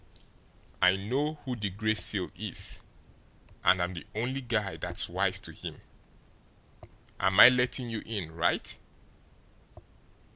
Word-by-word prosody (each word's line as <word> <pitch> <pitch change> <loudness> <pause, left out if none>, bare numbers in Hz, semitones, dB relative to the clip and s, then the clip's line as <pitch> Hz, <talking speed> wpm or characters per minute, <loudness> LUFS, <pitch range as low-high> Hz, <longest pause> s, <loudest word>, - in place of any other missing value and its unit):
I 90 +1 +6
know 135 +10 -2
who 130 -2 -3
the 105 -3 -3
Gray 110 +3 -1
Seal 110 - +1
is - - -4 0.8
and 90 +1 +4
I'm 90 +1 -1
the 85 - -7
only 125 +5 -2
guy 110 -6 -2
that's - - 0
wise - - 0
to - - -7
him. - - -9 1.4
Am 95 +1 +2
I 125 - +12
letting 125 -1 0
you 110 - -4
in 100 -8 -5
right?" 85 +1 0
110 Hz, 130 wpm, -29 LUFS, 95-125 Hz, 1.4 s, I